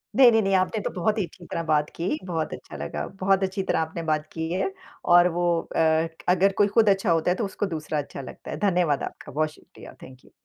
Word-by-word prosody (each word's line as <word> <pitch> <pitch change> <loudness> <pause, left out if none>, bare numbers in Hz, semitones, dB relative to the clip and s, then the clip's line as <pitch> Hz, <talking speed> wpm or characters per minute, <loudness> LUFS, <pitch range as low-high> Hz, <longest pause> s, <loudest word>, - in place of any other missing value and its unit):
नहीं, 255 -2 +8
नहीं, 225 -1 +4
नहीं 195 -1 0
आपने 185 +4 +1
तो - - -2
बहुत 210 +5 0
ही 205 - +1
अच्छी 175 +1 -15
तरह 170 - -4
बात 150 -2 +1
की, 185 - -2
बहुत 165 -4 -2
अच्छा - - -10
लगा। 75 - -4 0.2
बहुत 195 0 +3
अच्छी 190 +1 -1
तरह 175 - 0
आपने 160 +1 -3
बात 155 -1 0
की 160 0 -3
है 185 - -1 0.3
और 175 0 +6
वो 175 0 0
अ, - - -18
क 160 0 +3 0.2
अगर 185 +2 +4
कोई 205 - +5
खुद 215 +1 +4
अच्छा 195 -1 +2
होता 165 +1 +2
है, - - +1
तो 225 - -1
उसको 200 +1 -3
दूसरा 155 0 -3
अच्छा 140 -1 -6
लगता 130 - -9
है। - - -4
धन्यवाद 175 -7 +1
आपका, - - -8
बहुत 155 +3 0
शुक्रिया, - - -15
थैंक 130 0 -14
यू। - - -21
175 Hz, 245 wpm, -25 LUFS, 160-195 Hz, 0.3 s, नहीं